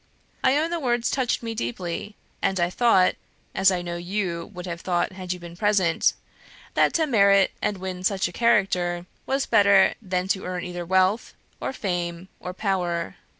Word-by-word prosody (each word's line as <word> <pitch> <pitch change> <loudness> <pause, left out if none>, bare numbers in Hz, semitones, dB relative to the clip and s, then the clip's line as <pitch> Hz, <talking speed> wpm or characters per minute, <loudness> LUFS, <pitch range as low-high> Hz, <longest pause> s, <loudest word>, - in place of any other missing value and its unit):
I 270 - +4
own 320 +3 0
the 340 - -1
words 240 -4 0
touched 255 -3 0
me 230 -1 -3
deeply, 180 - -4 0.3
and 195 -1 +1
I 175 0 +1
thought 190 -5 +4 0.4
(as 195 0 +4
I 180 -2 -1
know 175 0 -4
YOU 175 -1 -3
would 180 -2 -8
have 170 -1 -5
thought 175 -1 0
had 185 -1 -6
you 180 - -2
been 170 -1 -10
present) 190 -3 +2 0.6
that - - +3
to 325 -2 +3
merit 200 -7 +4
and 205 - -1
win 185 -1 -5
such 195 -1 +1
a - - -8
character 185 -6 +1 0.2
was 270 +1 0
better 200 -3 +5
than 185 -3 -2
to 190 - 0
earn 180 -1 -3
either 175 -1 -5
wealth, 190 +4 +2 0.2
or - - -3
fame, 175 -5 -3
or 180 - -5
power. 180 -3 -2
185 Hz, 180 wpm, -24 LUFS, 175-210 Hz, 0.6 s, better